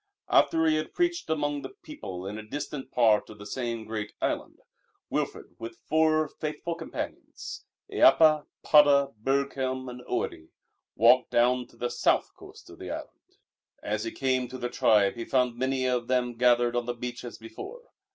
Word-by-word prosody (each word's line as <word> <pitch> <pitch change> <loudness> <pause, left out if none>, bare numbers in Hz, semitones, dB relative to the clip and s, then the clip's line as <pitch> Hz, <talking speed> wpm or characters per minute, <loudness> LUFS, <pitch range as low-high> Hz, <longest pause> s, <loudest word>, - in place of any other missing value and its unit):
After 160 0 +4
he 155 -1 +3
had 155 - -4
preached 345 0 0
among 145 -2 -1
the - - -9
people 95 - -7
in 105 +2 -5
a - - -8
distant 140 +4 -6
part 110 -4 +3
of 105 - -11
the 105 - -10
same 115 0 -4
great 110 -2 -5
island, - - -2 0.5
Wilfrid - - -3
with 115 0 -7
four 155 0 +3
faithful 155 +2 -4
companions 165 -1 -7 0.2
Eappa, 155 -2 +5 0.2
Padda, 140 -2 +5
Burghelm 135 -1 -1
and 125 0 -8
Oiddi 80 - -3 0.5
walked 120 +4 +5
down 125 +1 +2
to - - -22
the 120 - -2
south - - +1
coast - - -14
of - - -14
the - - -7
island. - - -9 0.5
As 105 0 -2
he 115 - -2
came 130 -2 0
to 130 - -8
the 120 -1 -3
tribe 105 -4 +4
he 120 - -6
found 125 -1 +1
many 130 +1 -1
of 125 -2 0
them 125 -1 +1
gathered 120 0 +3
on 120 0 -1
the 120 - -2
beach 125 +1 -6
as 120 - -8
before. 115 - -9
125 Hz, 170 wpm, -28 LUFS, 115-145 Hz, 0.5 s, Eappa